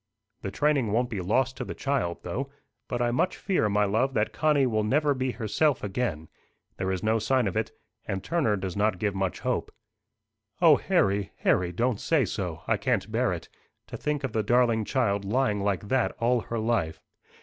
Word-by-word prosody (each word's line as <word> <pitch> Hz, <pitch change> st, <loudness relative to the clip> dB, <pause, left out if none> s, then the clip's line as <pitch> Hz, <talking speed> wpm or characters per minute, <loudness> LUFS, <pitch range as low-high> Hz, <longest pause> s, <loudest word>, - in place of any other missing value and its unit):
"The -, -, -3 dB
training 140 Hz, 0 st, +1 dB
won't 120 Hz, +3 st, +1 dB
be 100 Hz, -4 st, -2 dB
lost 125 Hz, +7 st, +1 dB
to -, -, -3 dB
the -, -, -6 dB
child 135 Hz, -12 st, -1 dB
though. 130 Hz, +10 st, -3 dB, 0.4 s
But 120 Hz, -1 st, -1 dB
I 120 Hz, -, +1 dB
much 125 Hz, +9 st, 0 dB
fear, 180 Hz, -, +1 dB
my 105 Hz, +1 st, +2 dB
love, 120 Hz, +7 st, +1 dB
that 105 Hz, 0 st, +1 dB
Connie 150 Hz, -3 st, +3 dB
will 110 Hz, -4 st, +1 dB
never 145 Hz, +6 st, +2 dB
be 130 Hz, -1 st, -1 dB
herself 130 Hz, +6 st, +1 dB
again. 95 Hz, -7 st, -2 dB, 0.5 s
There 95 Hz, 0 st, -1 dB
is 95 Hz, -1 st, -3 dB
no 110 Hz, +1 st, +2 dB
sign 130 Hz, +2 st, +2 dB
of 95 Hz, -, -2 dB
it. 110 Hz, 0 st, -1 dB, 0.4 s
And 95 Hz, 0 st, -3 dB
Turner 150 Hz, -10 st, +1 dB
does 95 Hz, -2 st, -4 dB
not 105 Hz, -1 st, +1 dB
give 100 Hz, +2 st, -1 dB
much 95 Hz, -1 st, -2 dB
hope." -, -, -1 dB, 0.9 s
"O -, -, +7 dB
Harry, 100 Hz, 0 st, +1 dB
Harry, 90 Hz, -1 st, +2 dB
don't 115 Hz, +4 st, 0 dB
say 155 Hz, -6 st, +2 dB
so! 90 Hz, -5 st, -4 dB
I -, -, +2 dB
can't -, -, -1 dB
bear -, -, +1 dB
it. -, -, -5 dB, 0.4 s
To -, -, -6 dB
think 150 Hz, -2 st, -2 dB
of 130 Hz, -5 st, -3 dB
the 110 Hz, -, +1 dB
darling 115 Hz, 0 st, +2 dB
child 100 Hz, -6 st, 0 dB
lying 105 Hz, 0 st, +1 dB
like 100 Hz, 0 st, -1 dB
that 130 Hz, -2 st, +1 dB
all 120 Hz, +2 st, +2 dB
her 115 Hz, -, -4 dB
life!" 110 Hz, -8 st, 0 dB
110 Hz, 195 wpm, -27 LUFS, 100-130 Hz, 0.9 s, O